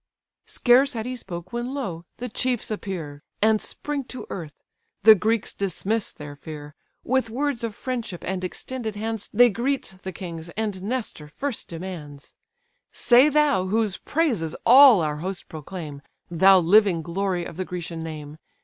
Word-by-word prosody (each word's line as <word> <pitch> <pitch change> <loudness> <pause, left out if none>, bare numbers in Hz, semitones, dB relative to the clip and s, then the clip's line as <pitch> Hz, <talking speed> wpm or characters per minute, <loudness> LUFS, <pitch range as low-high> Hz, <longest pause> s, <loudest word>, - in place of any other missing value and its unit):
Scarce 265 +3 +4
had 225 -2 -4
he 255 0 -3
spoke, 185 -5 -8
when, 240 +3 -3
lo! 175 -12 -4
the 250 - -4
chiefs 245 0 -2
appear, 170 -9 -5 0.2
And 215 0 +3
spring 295 -2 -4
to 255 - -7
earth; 155 -5 -7 0.4
the 220 +1 +10
Greeks 215 +2 0
dismiss 200 +2 -2
their 145 -1 -9
fear: 150 0 -9 0.3
With 260 -2 +1
words 265 0 -1
of 225 -3 -3
friendship 235 -8 -4
and 185 0 -3
extended 220 +4 -5
hands 220 0 -4
They 240 +2 +6
greet 235 -4 -2
the 190 - -5
kings; 170 -3 -7
and 210 -4 -2
Nestor 210 -8 -4
first 265 - -4
demands: 165 -5 -8 0.6
"Say 250 +4 +5
thou, 290 -11 +2
whose 215 -1 0
praises 235 - -1
all 255 -4 +9
our 150 -1 -1
host 185 +4 -5
proclaim, 155 -2 -8 0.3
Thou 190 +3 +6
living 185 -1 +4
glory 180 0 -2
of - - -8
the 185 - -2
Grecian 170 -2 -5
name! 155 -1 -7
195 Hz, 155 wpm, -24 LUFS, 170-240 Hz, 0.6 s, the